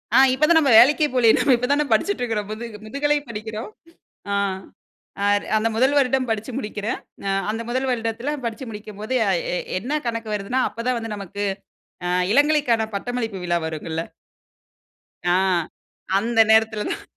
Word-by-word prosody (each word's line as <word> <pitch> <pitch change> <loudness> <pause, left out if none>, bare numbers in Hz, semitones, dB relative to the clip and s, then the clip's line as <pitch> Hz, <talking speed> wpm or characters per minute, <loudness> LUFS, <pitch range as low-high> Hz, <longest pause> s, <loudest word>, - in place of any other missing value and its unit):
ஆ 265 - +8
இப்ப 285 +4 +3
தான் 335 - +6
நம்ம 280 -5 +2
வேலைக்கே 295 +5 +5
போலையே, 235 -3 +5
நம்ம 275 -3 +4
இப்போ 250 +1 -2
தானே 295 +1 +2
படிச்சிட்டுருக்கிறோம், 225 - 0
முது 220 +2 -5 0.2
முதுகலை 290 +5 0
படிக்கிறோம். 220 - -6 0.6
ஆ, - - +1 1.2
அந்த 220 +1 +1
1ல் 260 +5 +3
வருடம் 265 -1 +2
படிச்சு 225 +3 -2
முடிக்கிறேன், 210 -3 -3 0.3
ஆ - - +1 0.2
அந்த 225 - -4
1ல் 260 +2 -1
வருடத்தில 235 +3 -2
படிச்சு 230 +3 -4
முடிக்கும்போது 210 +2 -6
அ - - +3 0.2
எ - - 0 0.2
என்ன 290 +9 -2
கணக்கு 230 -2 -3
வருதுன்னா, 210 +6 -1
அப்பதான் 240 +2 -2
வந்து 225 -2 -5
நமக்கு, 200 0 -6 0.6
ஆ. - - 0 0.2
இளங்கலைக்கான 280 -6 +3
பட்டமளிப்பு 225 -2 -3
விழா 175 -1 +1
வருங்கள்ல. 160 +1 -4 1.3
ஆ - - +4 0.8
அந்த 225 +3 0
நேரத்தில 220 -1 +3
தான். - - -4
230 Hz, 145 wpm, -22 LUFS, 215-260 Hz, 1.3 s, ஆ